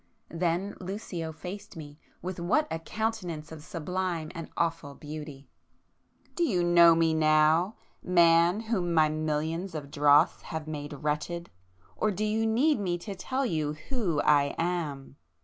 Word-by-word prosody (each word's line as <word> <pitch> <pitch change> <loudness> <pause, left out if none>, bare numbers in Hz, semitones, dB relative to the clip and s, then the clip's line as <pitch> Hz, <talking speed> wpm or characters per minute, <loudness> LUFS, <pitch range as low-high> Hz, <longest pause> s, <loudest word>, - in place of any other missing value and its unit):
Then 175 +4 -1
Lucio 180 -4 -5
faced 180 +5 -8
me,—with 160 +4 -9
what 240 - +1
a 165 - -2
countenance 180 -6 -4
of 155 -2 -9
sublime 170 0 -3
and 165 -2 -7
awful 165 -4 -1
beauty! 150 -2 -8 0.9
"Do 345 - 0
you 185 - +1
know 170 -1 +7
Me 165 -1 +3
now, 155 +5 +3 0.3
man 170 +2 +4
whom 190 -7 -1
my 155 -1 +5
millions 155 +3 -2
of 145 -2 -6
dross 145 +3 +4
have 160 -2 -6
made 145 -1 -5
wretched?—or 150 - -4
do 210 +1 -1
you 220 +1 +1
need 250 +5 +3
me 180 -3 -1
to 200 +4 -7
tell 260 +8 -2
you 155 -7 -1 0.2
Who 210 - 0
I 145 -1 +3
am?" 155 -6 -3
165 Hz, 140 wpm, -28 LUFS, 155-185 Hz, 0.9 s, know